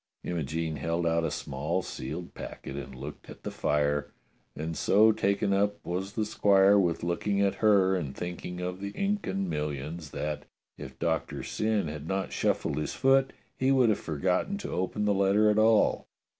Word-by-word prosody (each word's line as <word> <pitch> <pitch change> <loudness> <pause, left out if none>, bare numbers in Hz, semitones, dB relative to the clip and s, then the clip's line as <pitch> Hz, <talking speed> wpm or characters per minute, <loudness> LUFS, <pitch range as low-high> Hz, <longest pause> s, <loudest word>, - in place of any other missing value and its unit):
Imogene 80 -1 -2
held 85 +4 -1
out 85 0 +2
a - - 0
small 75 +7 -2
sealed 85 +2 -6
packet, 70 - -8
and 70 -2 -7
looked 65 - -9
at - - -11
the - - -4
fire, 75 0 0 0.5
and 80 +2 -4
so 105 +8 +5
taken 100 -1 +1
up 100 +1 +1
was 95 +3 -3
the 110 - 0
squire 100 -1 +5
with 85 -4 0
looking 100 +4 0
at 100 -1 +3
her 100 -3 +5
and 75 -7 -3
thinking 90 0 -5
of 90 +1 -4
the 100 - -3
Incan 195 - -1
millions 75 0 -4
that, 75 +1 -4 0.3
if 65 0 -9
Doctor 80 +2 -1
Syn 110 -4 0
had 75 0 -6
not 95 +1 -2
shuffled - - 0
his 75 - -2
foot, 135 0 +4 0.2
he 130 +1 +2
would 130 -4 +5
have 105 - +2
forgotten 90 - -1
to - - -6
open 95 +3 -1
the 105 - +3
letter 100 +2 +4
at 105 - +2
all. 110 0 +3
90 Hz, 175 wpm, -29 LUFS, 80-105 Hz, 0.5 s, so